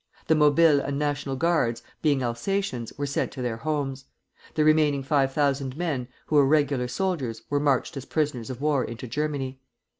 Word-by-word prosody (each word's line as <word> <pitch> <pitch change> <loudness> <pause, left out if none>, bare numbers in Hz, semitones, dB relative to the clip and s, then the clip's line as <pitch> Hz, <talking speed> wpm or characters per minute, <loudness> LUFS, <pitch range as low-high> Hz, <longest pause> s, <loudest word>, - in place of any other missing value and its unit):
The 160 - +3
Mobiles 150 0 +5
and 140 0 -3
National 145 -2 -1
Guards, 130 -7 +1 0.2
being 145 -4 +2
Alsatians, 120 - -2
were 145 - -1
sent 140 - -1
to 130 - -5
their 120 -2 -2
homes; 140 -1 -3 0.5
the 155 - +3
remaining 150 -3 +3
five 135 -1 +2
thousand 140 -1 0
men, 150 -8 -2 0.2
who 150 - +1
were 140 -2 +6
regular 140 -4 +2
soldiers, 135 - -2
were 145 - +2
marched 140 -2 +1
as 135 - -6
prisoners 145 -7 -1
of 130 0 -6
war 145 -3 +2
into 115 +2 -6
Germany. 135 0 -3
140 Hz, 175 wpm, -26 LUFS, 130-150 Hz, 0.5 s, were